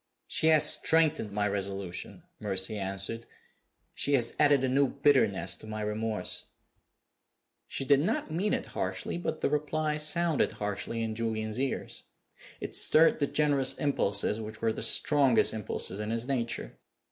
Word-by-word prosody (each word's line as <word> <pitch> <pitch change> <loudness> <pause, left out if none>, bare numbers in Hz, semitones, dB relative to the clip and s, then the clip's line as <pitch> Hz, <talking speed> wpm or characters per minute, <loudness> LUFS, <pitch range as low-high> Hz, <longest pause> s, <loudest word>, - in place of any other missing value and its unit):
"She 160 - +1
has 155 -1 +6
strengthened 160 -9 +2
my 105 0 0
resolution," 100 -2 -5 0.2
Mercy 95 0 -1
answered. 100 +3 -3 0.7
"She 145 - 0
has 120 -3 0
added 145 -3 +4
a - - +2
new 135 +2 +2
bitterness 140 -7 +2
to - - -12
my 110 0 -5
remorse." 105 -2 -3 1.2
She 135 - -3
did 140 0 +4
not 220 - -2
mean 190 +6 0
it - - -4
harshly, 95 - -3
but 160 -2 -4
the - - +1
reply 150 +1 -1
sounded 155 0 +1
harshly 105 +3 -4
in 110 -1 -3
Julian's 110 0 -3
ears. 135 0 -4 0.5
It - - -6
stirred 160 +1 +5
the 145 - +1
generous 140 -3 +1
impulses, 115 -7 0
which 110 0 -8
were 115 -1 0
the - - -6
strongest 140 -5 +3
impulses 105 -2 -3
in 105 0 -4
his 115 +2 -2
nature. 120 -4 -3
115 Hz, 150 wpm, -29 LUFS, 105-150 Hz, 1.2 s, has